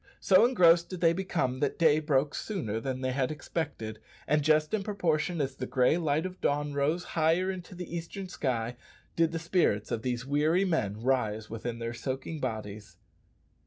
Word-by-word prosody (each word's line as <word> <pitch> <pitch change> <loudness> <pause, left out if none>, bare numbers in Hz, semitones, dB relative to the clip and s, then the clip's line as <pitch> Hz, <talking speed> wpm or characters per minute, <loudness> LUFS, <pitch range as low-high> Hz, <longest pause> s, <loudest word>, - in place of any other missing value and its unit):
So 195 +4 +5
engrossed 170 -8 +5
did 185 - -6
they 165 -1 +4
become 165 -8 -1
that 145 -1 0
day 155 -2 +4
broke 145 -1 +1
sooner 135 - -3
than 130 +2 -4
they 130 0 0
had 130 -1 0
expected, 145 -8 -4 0.3
and 150 +1 +2
just 155 +3 +2
in 215 - +1
proportion 175 -4 -1
as 135 -2 -1
the 130 -1 -5
gray 130 +3 +3
light 160 -1 0
of 185 0 -7
dawn 145 0 0
rose 150 +5 0
higher 170 +4 +1
into 180 -1 -8
the 175 -1 -6
eastern 170 +3 -5
sky 125 -8 -2 0.4
did 165 -1 +2
the 165 - -2
spirits 165 - +1
of 115 - -1
these 125 0 -2
weary 155 +7 +2
men 110 - -1
rise 110 -5 0
within 115 +1 -4
their 115 0 -4
soaking 130 +6 -4
bodies. 110 -5 -5
150 Hz, 180 wpm, -29 LUFS, 125-170 Hz, 0.4 s, So